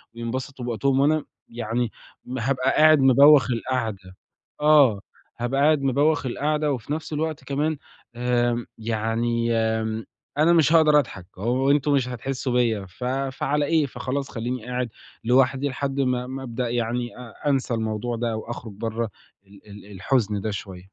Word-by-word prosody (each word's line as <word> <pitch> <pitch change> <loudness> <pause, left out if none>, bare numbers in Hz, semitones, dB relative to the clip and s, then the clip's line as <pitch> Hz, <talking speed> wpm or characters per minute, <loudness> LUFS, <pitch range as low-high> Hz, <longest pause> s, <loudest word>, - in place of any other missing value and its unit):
وينبسطوا 125 +2 -5
بوقتهم 130 +3 +1
وأنا 150 +2 +2 0.2
يعني 115 0 -2 0.5
هابقى 130 +2 +1
قاعد 155 -1 +6
مبوّخ 135 0 +6
القعدة. 110 -7 -3 0.5
آه، 145 -9 +5 0.4
هابقى 130 +3 0
قاعد 150 -1 +4
مبوّخ 145 +3 +2
القعدة 150 +4 0
وفي 130 +2 -3
نفس 155 0 -5
الوقت 155 0 -2
كمان 150 +2 -1 0.4
آآ، 120 -1 0
يعني 115 +1 -1
آمم، 110 -1 -1 0.3
أنا 165 +3 +5
مش 160 -1 +4
هاقدَر 155 -2 +6
أضْحك، 100 -9 -5
هو 125 +6 +1
أنتم 145 0 +2
مش 130 -3 +2
هتحسّوا 125 +1 -3
بيَّ 115 -5 +1
ف 90 +7 -11
فعلى 135 +2 -1
إيه، 160 -1 +2
فخلاص 135 +2 -4
خلّيني 120 0 -4
قاعد 125 -1 -2 0.3
لوحدي 130 +3 +3
لحد 140 +1 -3
ما 125 -1 0
ما 135 +1 -6
أبدأ 120 0 -3
يعني 120 +1 -2
أ 125 +4 -5
أنسى 135 -3 0
الموضوع 110 +1 -2
ده 115 -1 -2
وأخرُج 115 -1 -7
برَّه 115 +2 -3 0.4
ال 100 0 -16
ال 105 0 -12
الحُزن 105 +1 0
ده 110 0 -2
شوية. 95 -3 -7
125 Hz, 150 wpm, -24 LUFS, 115-140 Hz, 0.5 s, قاعد